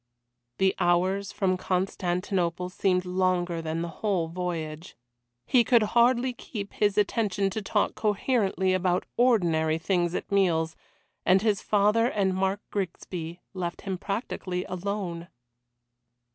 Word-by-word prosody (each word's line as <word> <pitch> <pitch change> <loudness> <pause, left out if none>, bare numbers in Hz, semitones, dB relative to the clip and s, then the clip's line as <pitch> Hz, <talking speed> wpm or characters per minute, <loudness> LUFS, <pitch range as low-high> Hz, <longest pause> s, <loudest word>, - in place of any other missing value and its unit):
The 190 0 +3
hours 190 +3 +1
from 185 -2 0
Constantinople 180 -1 -1
seemed 185 0 +1
longer 180 -2 0
than 160 +1 -2
the - - -3
whole 190 -6 0
voyage. 165 -2 -5 0.5
He 245 -2 +4
could 235 -1 +4
hardly 245 +1 +4
keep 205 -4 -7
his 205 -1 +1
attention 200 -2 +1
to 220 - -3
talk 200 - 0
coherently 205 -3 +1
about 185 -1 +1
ordinary 170 -10 +3
things 175 +1 0
at - - -4
meals, 165 -5 +2 0.5
and 190 +2 +4
his 215 -2 +2
father 210 +3 +3
and 195 -5 +1
Mark 190 +2 0
Grigsby 175 -3 -4
left 175 -2 -4
him 190 -2 -4
practically 190 -3 -3
alone. 185 -2 -4
185 Hz, 125 wpm, -27 LUFS, 175-205 Hz, 0.5 s, He